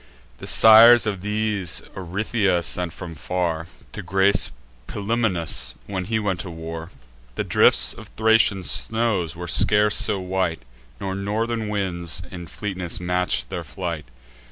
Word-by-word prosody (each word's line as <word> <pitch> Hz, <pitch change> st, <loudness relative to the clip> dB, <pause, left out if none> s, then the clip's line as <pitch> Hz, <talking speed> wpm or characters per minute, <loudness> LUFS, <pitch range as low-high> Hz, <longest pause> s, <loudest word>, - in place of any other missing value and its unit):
The -, -, -8 dB
sires 115 Hz, +2 st, +8 dB
of 100 Hz, -4 st, -3 dB
these 105 Hz, -3 st, -1 dB
Orythia 95 Hz, 0 st, -1 dB
sent 90 Hz, 0 st, -2 dB
from 85 Hz, -1 st, -9 dB
far, 85 Hz, +3 st, -3 dB, 0.2 s
To 105 Hz, -, -7 dB
grace 95 Hz, +2 st, +2 dB, 0.4 s
Pilumnus, 100 Hz, -6 st, -1 dB
when 95 Hz, -2 st, -4 dB
he 110 Hz, +2 st, -1 dB
went 100 Hz, -4 st, -2 dB
to 95 Hz, -, -6 dB
war. 80 Hz, 0 st, -7 dB, 0.5 s
The -, -, -2 dB
drifts -, -, +3 dB
of -, -, -12 dB
Thracian 110 Hz, -3 st, +3 dB
snows 110 Hz, -8 st, 0 dB
were 85 Hz, +1 st, -7 dB
scarce 105 Hz, +4 st, +4 dB
so 100 Hz, -, +1 dB
white, 90 Hz, -5 st, -2 dB, 0.4 s
Nor 95 Hz, -1 st, -4 dB
northern 110 Hz, +3 st, -2 dB
winds 85 Hz, -4 st, -2 dB
in 85 Hz, -2 st, -8 dB
fleetness 95 Hz, -4 st, -4 dB
match'd 90 Hz, -8 st, -1 dB
their 85 Hz, -, -4 dB
flight. 85 Hz, -3 st, -5 dB
95 Hz, 135 wpm, -22 LUFS, 85-105 Hz, 0.5 s, sires